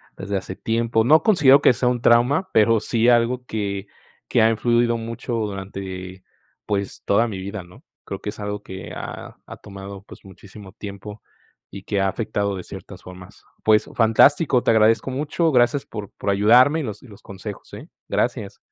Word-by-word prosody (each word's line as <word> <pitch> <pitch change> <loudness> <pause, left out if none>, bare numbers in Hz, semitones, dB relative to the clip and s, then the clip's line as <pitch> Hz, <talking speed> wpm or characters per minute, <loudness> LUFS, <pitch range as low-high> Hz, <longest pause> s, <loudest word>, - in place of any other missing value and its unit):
desde 100 +1 -3
hace 95 0 -6
tiempo. 115 +1 0
No 155 +7 +5
considero 145 -10 +5
que - - +5
sea 125 +1 0
un 125 -1 -2
trauma, 125 +11 +3
pero 110 +1 +4
sí 115 +2 +1
algo 120 +1 +2
que 100 -3 -4 0.4
que - - +2
ha 110 - +5
influido 120 +1 +1
mucho 115 +2 -6
durante, 95 -3 -6 0.4
pues, 100 -2 -3
toda 115 +4 +2
mi 105 -4 -6
vida, 100 +2 -6
¿no?, 90 +1 -18 0.2
creo - - -6
que - - -4
es - - -15
algo 105 0 -5
que 95 0 -9
ha - - -8
ha - - -10
tomado, 100 0 -10
pues, 105 - -15
muchísimo 95 +1 -13
tiempo 100 0 -9 0.5
y 95 0 -10
que 100 0 -2
ha 95 - +2
afectado 100 0 -2
de 90 - -7
ciertas - - -11
formas. 90 +3 -13 0.2
Pues 110 0 +3
fantástico, 125 +4 +4
te - - +3
agradezco 110 +3 +3
mucho, 155 +4 0
gracias 125 +1 +2
por 105 -3 -8
por - - -4
ayudarme 120 +10 +5
y - - -3
los 105 -5 -7
y - - -14
los 105 -3 -15
consejos, 100 +1 -10
¿eh? - - -10 0.2
Gracias. - - -2
110 Hz, 185 wpm, -22 LUFS, 100-120 Hz, 0.5 s, No